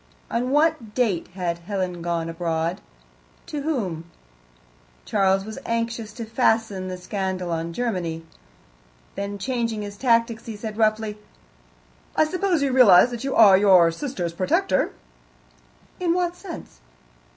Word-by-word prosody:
On 245 +2 0
what 295 -7 +1
date 215 -9 +1
had 175 -2 -2
Helen 180 -1 -3
gone 170 -1 -2
abroad? 165 0 -2 0.6
To 295 - -5
whom? 205 - -2 1.0
(Charles 195 - +2
was 220 0 -7
anxious 230 -1 -2
to 230 +1 -6
fasten 220 -4 +1
the 185 0 -5
scandal 185 -1 -3
on 165 0 -2
Germany.) 175 -7 -3 0.9
Then, 200 0 -4
changing 230 -1 -2
his 205 0 -8
tactics, 230 -2 +1
he 225 - -5
said 215 0 -6
roughly: 215 -1 0 1.0
"I - - +5
suppose 360 -1 0
you 275 - +1
realize 245 -3 +7
that 240 0 -5
you 270 - -2
are 205 -4 +8
your 190 -4 +6
sister's 175 - -4
protector?" 185 +2 +1 1.1
"In 350 -2 +1
what 355 -1 0
sense?" 340 - -10
210 Hz, 130 wpm, -24 LUFS, 180-245 Hz, 1.1 s, are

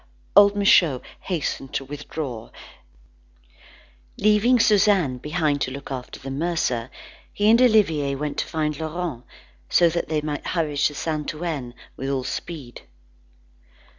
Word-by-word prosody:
Old 200 0 +7
Michaud 175 -9 +4 0.2
hastened 155 -6 -3
to 135 - -2
withdraw. 140 -4 -6 1.7
Leaving 215 +4 +4
Suzanne 195 - +3
behind 150 -1 -1
to - - 0
look 140 +1 -8
after 130 -2 -6
the 135 - -7
mercer, 135 -6 -1 0.4
he 205 - 0
and 230 +2 +5
Olivier 165 - +3
went 145 +1 -3
to - - -1
find 150 -2 -2
Laurent, 160 -5 -4 0.5
so 170 - +5
that 170 -1 -3
they 155 -1 0
might 150 -1 -4
hurry 160 -4 -1
to 145 +1 +1
Saint 155 0 -3
Ouen 150 -7 -4 0.2
with 135 - -4
all 135 -2 -1
speed. 135 -3 -6
150 Hz, 135 wpm, -23 LUFS, 135-175 Hz, 1.7 s, Old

